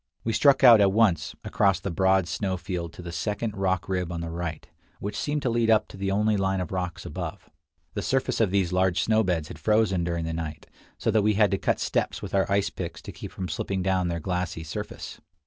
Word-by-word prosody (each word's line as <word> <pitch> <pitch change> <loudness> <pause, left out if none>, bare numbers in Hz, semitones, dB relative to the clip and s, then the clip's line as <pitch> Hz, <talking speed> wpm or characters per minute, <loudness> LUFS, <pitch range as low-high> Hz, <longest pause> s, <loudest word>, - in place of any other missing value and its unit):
We 115 - -1
struck 135 +3 +4
out 115 -4 +9
at 100 -1 +5
once 100 -7 +2
across 100 -3 +2
the 95 - -4
broad 95 +1 +3
snow 95 +2 -2
field 90 -3 -4
to 90 - -10
the 85 - -6
second 105 +4 -2
rock 95 -2 0
rib 90 -2 -1
on 85 -1 -4
the 85 -1 -4
right, 85 -2 -5 0.3
which 100 +1 -4
seemed 145 0 -2
to 125 - +1
lead 115 -1 +1
up 110 -1 +4
to - - -11
the 95 0 -2
only 105 +2 +2
line 95 0 0
of 90 - -4
rocks 90 -2 -3
above. 90 +4 -6 0.4
The - - -2
surface 135 -3 0
of 110 - +3
these 95 -2 +1
large 95 -1 +2
snow 110 0 +3
beds 85 -5 -1
had - - -9
frozen 105 -5 +2
during 85 -1 -2
the 80 - -3
night, 80 -2 -5 0.3
so - - 0
that 110 - +3
we 105 0 +2
had 105 0 +4
to 100 - 0
cut - - 0
steps - - -1
with - - -8
our 95 0 +1
ice 100 +1 +2
picks 85 -3 -6
to - - -7
keep - - -9
from 95 - -5
slipping 95 +1 -2
down 95 -1 +1
their 85 -1 -2
glassy 90 -1 -3
surface. 75 - -7
95 Hz, 235 wpm, -26 LUFS, 85-105 Hz, 0.4 s, out